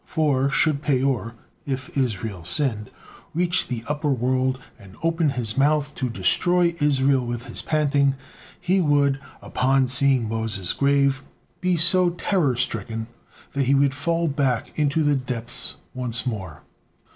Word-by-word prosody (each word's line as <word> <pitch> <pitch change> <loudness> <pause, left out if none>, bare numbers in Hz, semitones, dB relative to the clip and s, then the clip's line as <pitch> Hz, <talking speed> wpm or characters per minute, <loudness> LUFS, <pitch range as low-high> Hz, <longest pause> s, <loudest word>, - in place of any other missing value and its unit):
For 140 -4 +1
should 145 0 +2
Peor, 130 -6 0 0.3
if 130 -2 -5
Israel 110 -8 -2
sinned, 105 - +2 0.5
reach 180 +1 +1
the 120 -3 -4
upper 150 +1 -1
world 130 +1 0 0.2
and 100 -2 -15
open 165 -1 +1
his 120 -5 -3
mouth 150 +1 +2
to 130 - -3
destroy 170 - +2
Israel 135 -2 +2
with 120 0 -5
his 120 - -6
panting, 145 -3 +1 0.4
he 185 +1 +1
would, 145 -3 +2 0.2
upon 130 +1 +1
seeing 130 -2 +3
Moses' 110 -5 -2
grave, 140 -1 +2 0.4
be 180 -1 +1
so 180 +2 +4
terror 170 -5 0
stricken, 115 -2 -3 0.4
that 140 -1 -1
he 135 +2 +3
would 140 -1 +3
fall 165 +4 -1
back 135 -5 -1
into 150 +1 +1
the 145 -1 +2
depths 125 -2 -4 0.2
once 120 -3 +1
more. 95 - -5
135 Hz, 140 wpm, -23 LUFS, 120-150 Hz, 0.5 s, so